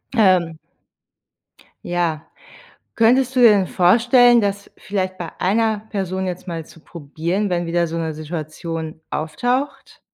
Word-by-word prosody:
Ähm. 180 Hz, -7 st, +3 dB, 1.3 s
Ja. 170 Hz, -3 st, -1 dB, 0.7 s
Könntest 250 Hz, +3 st, +3 dB
du 255 Hz, -, +2 dB
dir 235 Hz, -, +9 dB
denn 195 Hz, -3 st, +3 dB
vorstellen, 240 Hz, +6 st, +4 dB
dass 200 Hz, 0 st, -3 dB
vielleicht 185 Hz, -2 st, -3 dB
bei 170 Hz, -2 st, -5 dB
einer 215 Hz, +3 st, +1 dB
Person 190 Hz, -2 st, -3 dB
jetzt 180 Hz, +1 st, -5 dB
mal 165 Hz, -2 st, -5 dB
zu 165 Hz, -, -17 dB
probieren, 170 Hz, +6 st, -4 dB
wenn 175 Hz, -1 st, -1 dB
wieder 170 Hz, 0 st, 0 dB
so 165 Hz, -, -5 dB
'ne 160 Hz, -2 st, -3 dB
Situation 160 Hz, +1 st, -6 dB
auftaucht? 245 Hz, -, -3 dB
180 Hz, 130 wpm, -20 LUFS, 165-215 Hz, 1.3 s, dir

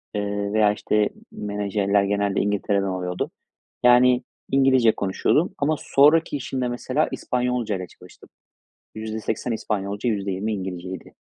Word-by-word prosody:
ııı, 100 Hz, 0 st, -2 dB
veya 105 Hz, -1 st, +4 dB
işte 105 Hz, 0 st, +1 dB, 0.2 s
menajerler 100 Hz, -1 st, 0 dB
genelde 100 Hz, 0 st, 0 dB
İngiltere'den 100 Hz, -1 st, 0 dB
oluyordu. 90 Hz, -1 st, -3 dB, 0.5 s
Yani 125 Hz, +1 st, +5 dB, 0.3 s
İngilizce 130 Hz, -4 st, +5 dB
konuşuyordum. 100 Hz, -, +1 dB
Ama 150 Hz, +2 st, +1 dB
sonraki 150 Hz, +2 st, +4 dB
işimde 130 Hz, -1 st, -3 dB
mesela 130 Hz, +4 st, -1 dB
İspanyolcayla 125 Hz, -7 st, -2 dB
çalıştım. -, -, -17 dB, 0.7 s
%80 110 Hz, +2 st, -3 dB
İspanyolca, 105 Hz, 0 st, -2 dB
%20 100 Hz, 0 st, -1 dB
İngilizceydi. 95 Hz, -2 st, -6 dB
105 Hz, 105 wpm, -23 LUFS, 100-125 Hz, 0.7 s, Yani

